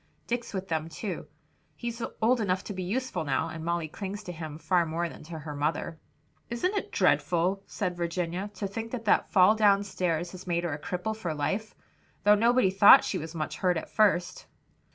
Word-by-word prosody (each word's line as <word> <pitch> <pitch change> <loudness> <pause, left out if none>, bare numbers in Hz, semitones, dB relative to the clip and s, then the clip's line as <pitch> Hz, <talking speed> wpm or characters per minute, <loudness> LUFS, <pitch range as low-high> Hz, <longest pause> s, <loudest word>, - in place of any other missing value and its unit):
"Dick's 240 0 -3
with 190 -1 -4
them 160 -1 -2
too. 170 0 -5 0.5
He's 235 +6 -5 0.2
old 240 +1 +4
enough 185 -2 0
to 205 - -6
be 185 - -5
useful 195 -2 -2
now, 150 +3 0
and 160 0 -7
Molly 170 -1 -1
clings 200 +5 -6
to 180 - -6
him 160 -3 -7
far 170 +3 +2
more 165 +1 -2
than - - -11
to 165 0 -7
her 150 -1 -7
mother." 155 +2 -2 0.5
"Isn't 240 - -1
it 405 - -3
dreadful," 180 +3 +2
said 180 -3 -3
Virginia, 175 +3 -2
"to 205 - -3
think 225 +3 -4
that 230 -2 -4
that 205 - +3
fall 190 +2 +6
down 205 -2 +4
stairs 175 -3 -2
has 185 0 -11
made 170 -1 0
her 170 -3 -1
a 145 - -5
cripple 180 +7 -3
for 175 -8 -4
life? 195 +9 -2 0.5
though 205 - +7
nobody 230 -1 +4
thought 195 +1 +8
she 185 - -2
was 160 +1 -7
much 155 -2 -3
hurt 180 -2 +1
at - - -6
first." 195 -5 +2
180 Hz, 200 wpm, -28 LUFS, 165-210 Hz, 0.5 s, thought